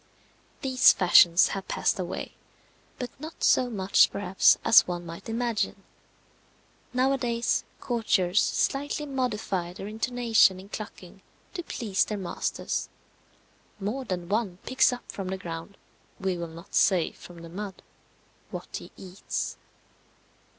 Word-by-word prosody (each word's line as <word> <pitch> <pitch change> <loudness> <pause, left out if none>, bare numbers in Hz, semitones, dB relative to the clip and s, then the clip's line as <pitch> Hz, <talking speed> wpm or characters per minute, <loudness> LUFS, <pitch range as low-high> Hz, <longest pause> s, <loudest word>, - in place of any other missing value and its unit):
These 260 -2 +6
fashions 175 -1 +6
have 195 -1 -5
passed - - 0
away; 180 -1 -4 0.6
but 250 -2 -5
not 315 +3 -8
so 250 -1 +4
much, 195 -4 +4
perhaps, 190 -1 +3
as 225 - +7
one 175 -1 -4
might 170 +6 -9
imagine. 230 -1 -1 1.1
Nowadays, 250 -2 +1 0.2
courtiers 210 -6 +1
slightly 290 +2 -1
modify 220 -10 -2
their 195 - -8
intonation 225 -3 +2
in 195 +2 -12
clucking 200 -3 -9 0.3
to 365 - -4
please 215 - 0
their 210 - -4
masters. 190 -3 -3 0.9
More 215 +7 -3
than 180 -6 -4
one 200 -2 -1
picks 260 0 +3
up 245 - -6
from 195 -2 -5
the 190 +1 -3
ground 170 +2 -7 0.4
we 190 -2 -1
will 170 -1 -4
not 165 +4 -13
say 180 -5 +3
from 170 -1 -13
the - - -8
mud 195 +2 -7 0.7
what - - -6
he - - -11
eats. 185 +1 -4
200 Hz, 130 wpm, -27 LUFS, 180-245 Hz, 1.1 s, as